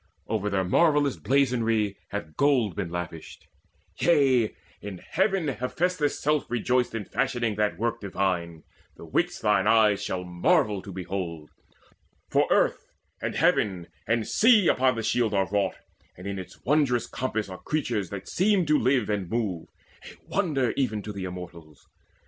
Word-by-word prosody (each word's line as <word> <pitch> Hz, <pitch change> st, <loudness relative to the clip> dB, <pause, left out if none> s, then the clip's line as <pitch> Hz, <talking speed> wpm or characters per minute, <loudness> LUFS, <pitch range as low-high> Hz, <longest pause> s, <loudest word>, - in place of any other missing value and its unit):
Over 105 Hz, -2 st, -1 dB
their 95 Hz, -1 st, 0 dB
marvellous 145 Hz, -, +3 dB
blazonry 115 Hz, -6 st, +1 dB
hath 85 Hz, -7 st, -6 dB
gold 130 Hz, -, +2 dB
Been 85 Hz, -, -3 dB
lavished; 85 Hz, -2 st, -7 dB, 0.5 s
yea, 135 Hz, -9 st, +3 dB, 0.3 s
in 100 Hz, -3 st, -7 dB
heaven 190 Hz, -, 0 dB
Hephaestus' 145 Hz, +5 st, -1 dB
self 150 Hz, -2 st, 0 dB
Rejoiced 125 Hz, +1 st, 0 dB
in 105 Hz, -3 st, -3 dB
fashioning 115 Hz, +1 st, -1 dB
that 105 Hz, -5 st, 0 dB
work 115 Hz, +2 st, -2 dB
divine, 90 Hz, -5 st, -2 dB, 0.3 s
The -, -, -10 dB
which -, -, -1 dB
thine -, -, +2 dB
eyes 110 Hz, -2 st, +4 dB
shall 90 Hz, -1 st, -3 dB
marvel 100 Hz, -, +1 dB
to 100 Hz, -, -9 dB
behold; 90 Hz, -4 st, -5 dB, 0.8 s
For -, -, +3 dB
earth -, -, +2 dB, 0.4 s
and -, -, -3 dB
heaven 90 Hz, -4 st, +1 dB, 0.2 s
and 115 Hz, -1 st, +1 dB
sea 220 Hz, -5 st, +5 dB
upon 130 Hz, -1 st, +3 dB
the 115 Hz, -, -3 dB
shield 110 Hz, -1 st, +1 dB
Are 95 Hz, -1 st, +2 dB
wrought, 100 Hz, -1 st, 0 dB, 0.4 s
and 90 Hz, -, -11 dB
in 100 Hz, -1 st, -4 dB
its 95 Hz, -, -10 dB
wondrous 135 Hz, -4 st, +2 dB
compass 115 Hz, -5 st, -3 dB
are 95 Hz, -1 st, -8 dB
Creatures 120 Hz, -, -2 dB
that 100 Hz, -1 st, -7 dB
seem 195 Hz, -1 st, +2 dB
to 150 Hz, 0 st, +3 dB
live 130 Hz, +2 st, +2 dB
and 100 Hz, -4 st, -2 dB
move 105 Hz, -8 st, -2 dB, 0.4 s
a -, -, -11 dB
wonder 150 Hz, -11 st, 0 dB
Even 110 Hz, -7 st, -1 dB
to 105 Hz, -, -6 dB
the 95 Hz, -2 st, -5 dB
Immortals. 85 Hz, -5 st, -10 dB
110 Hz, 155 wpm, -26 LUFS, 95-135 Hz, 0.8 s, sea